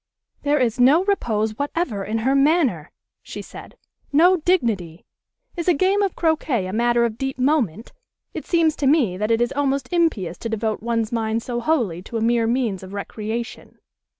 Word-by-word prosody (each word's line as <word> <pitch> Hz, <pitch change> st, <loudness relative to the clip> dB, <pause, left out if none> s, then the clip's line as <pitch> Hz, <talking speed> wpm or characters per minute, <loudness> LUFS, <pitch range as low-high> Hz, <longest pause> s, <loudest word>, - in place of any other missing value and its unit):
"There 295 Hz, 0 st, +1 dB
is 250 Hz, -2 st, 0 dB
no 280 Hz, +8 st, +5 dB
repose 220 Hz, -, -1 dB
whatever 285 Hz, -, -2 dB
in 215 Hz, +3 st, -2 dB
her 265 Hz, -, +3 dB
manner," 275 Hz, -, +2 dB, 0.3 s
she -, -, -8 dB
said. -, -, -12 dB, 0.3 s
"No 350 Hz, +6 st, +5 dB
dignity. 225 Hz, -, -1 dB, 0.5 s
Is 340 Hz, -1 st, -4 dB
a 355 Hz, -, +4 dB
game 380 Hz, +7 st, +2 dB
of 395 Hz, -3 st, 0 dB
croquet 310 Hz, -, 0 dB
a 185 Hz, -, -5 dB
matter 235 Hz, +1 st, +2 dB
of 225 Hz, -1 st, -4 dB
deep 270 Hz, -1 st, -3 dB
moment? 250 Hz, -, 0 dB, 0.4 s
It -, -, -7 dB
seems 325 Hz, -3 st, +2 dB
to 280 Hz, -, 0 dB
me 265 Hz, -, +3 dB
that 210 Hz, +3 st, -2 dB
it 230 Hz, 0 st, +2 dB
is 240 Hz, +2 st, +1 dB
almost 275 Hz, -2 st, -1 dB
impious 225 Hz, -, 0 dB
to 230 Hz, -, -4 dB
devote 220 Hz, -1 st, -2 dB
one's 230 Hz, -1 st, -1 dB
mind 225 Hz, -1 st, -1 dB
so 240 Hz, -1 st, -3 dB
wholly 235 Hz, -, 0 dB
to 225 Hz, +5 st, -6 dB
a -, -, -2 dB
mere 230 Hz, 0 st, +2 dB
means 230 Hz, -5 st, -1 dB
of 190 Hz, +1 st, -10 dB
recreation." 220 Hz, +4 st, -6 dB
240 Hz, 180 wpm, -22 LUFS, 220-300 Hz, 0.5 s, no